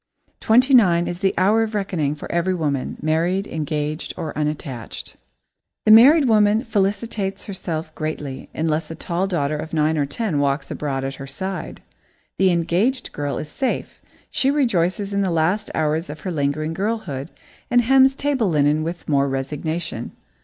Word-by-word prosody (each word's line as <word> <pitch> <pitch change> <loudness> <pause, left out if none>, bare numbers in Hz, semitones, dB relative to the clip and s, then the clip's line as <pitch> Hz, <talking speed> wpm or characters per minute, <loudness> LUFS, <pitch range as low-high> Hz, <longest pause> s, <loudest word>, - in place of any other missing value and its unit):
Twenty 255 +5 +4
nine 175 -8 +5
is 175 - -4
the 195 0 +1
hour 205 +5 +4
of 220 -1 -2
reckoning 170 -8 -1
for 145 - -8
every 180 +2 +1
woman, 145 -6 -2
married, 170 +5 +1
engaged, 155 -1 -3
or 165 -3 -5
unattached. 150 -5 -4 0.7
The 215 - +6
married 270 +7 +8
woman 215 0 +4
felicitates 205 -2 -1
herself 165 -5 -5
greatly, 150 -4 -5
unless 155 0 -1
a 160 - -6
tall 175 +3 -2
daughter 155 -5 -1
of 155 +2 -6
nine 155 0 +2
or 140 - +1
ten 165 0 -2
walks 140 0 0
abroad 135 -3 -3
at 135 0 -3
her 135 - -6
side. 190 +7 -5 0.6
The 190 - +5
engaged 185 +9 0
girl 145 -3 -3
is 150 - -5
safe 265 - -3 0.3
she 270 - +1
rejoices 200 - +1
in 200 - +1
the 190 - +1
last 180 +6 +1
hours 155 +1 0
of 150 +1 -8
her 185 - -4
lingering 155 +1 -1
girlhood 190 -8 -3 0.4
and 245 0 +4
hems 265 +2 +5
table 275 -8 0
linen 150 -1 +2
with 170 +2 -5
more 140 -2 +2
resignation. 150 +5 -4
170 Hz, 160 wpm, -22 LUFS, 150-205 Hz, 0.7 s, married